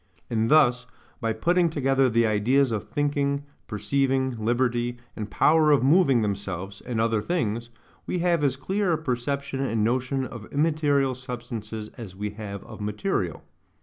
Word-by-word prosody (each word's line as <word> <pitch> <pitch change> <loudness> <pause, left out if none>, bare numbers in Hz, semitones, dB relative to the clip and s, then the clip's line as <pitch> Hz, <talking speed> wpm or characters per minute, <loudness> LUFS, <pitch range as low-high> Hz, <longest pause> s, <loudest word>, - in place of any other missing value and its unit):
And 115 0 +1
thus, 125 -5 +4 0.3
by 115 -3 0
putting 170 +10 +2
together 135 -3 +2
the 115 0 +3
ideas 120 +5 +2
of 110 -2 -2
thinking, 145 -1 0 0.2
perceiving, 130 +4 0
liberty, 120 +1 0 0.2
and 105 -2 -5
power 155 +6 +4
of 145 -3 +4
moving 140 -5 +4
themselves 100 -1 -4
and 120 -3 -3
other 115 -1 +2
things, 120 -7 -2 0.4
we - - -1
have 170 -3 +1
as 135 -3 +2
clear 190 +6 0
a - - +1
perception 140 -1 -2
and 115 -5 0
notion 130 +3 0
of 115 -4 -9
immaterial 145 -3 +2
substances 120 -4 -6
as 100 -5 -8
we 105 +1 -4
have 100 -2 -7
of - - -10
material. 105 - -2
125 Hz, 150 wpm, -26 LUFS, 110-140 Hz, 0.4 s, thus